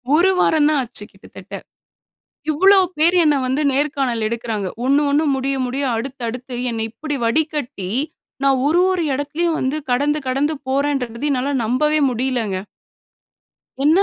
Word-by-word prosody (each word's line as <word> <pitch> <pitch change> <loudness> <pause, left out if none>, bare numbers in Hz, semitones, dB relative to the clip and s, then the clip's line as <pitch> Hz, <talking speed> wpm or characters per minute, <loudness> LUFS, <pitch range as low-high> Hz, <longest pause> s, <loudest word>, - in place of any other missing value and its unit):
ஒரு 350 +4 +4
வாரம் 305 -4 +3
தான் 305 -2 +2
ஆச்சு 240 -4 -7
கிட்டத்தட்ட, 195 +2 -14 1.0
இவ்ளோ 380 +6 +5 0.2
பேர் 335 +4 +4
என்ன 300 -2 +4
வந்து 260 +4 0
நேர்காணல் 270 -5 0
எடுக்குறாங்க. 225 -3 -3 0.2
ஒண்ணு 280 +3 +3
ஒண்ணு 295 +3 +2
முடிய 270 +1 -1
முடிய 270 +3 -2
அடுத்து 260 +3 -5
அடுத்து 250 +2 -6
என்ன 225 -1 -3
இப்படி 290 +6 -4
வடிக்கட்டி. 250 - -1 0.5
நான் 270 -1 +3
ஒரு 330 +4 +3
ஒரு 365 -2 0
எடத்திலும் 300 +5 -1
வந்து 265 +3 -1
கடந்து 290 +4 +2
கடந்து 280 +4 0
போறேன்றத 270 -3 -1
என்னால 275 +1 0
நம்பவே 300 +7 +1
முடியலங்க. 240 -5 -1 1.3
என்ன? 315 +6 +5
275 Hz, 135 wpm, -20 LUFS, 245-300 Hz, 1.3 s, இவ்ளோ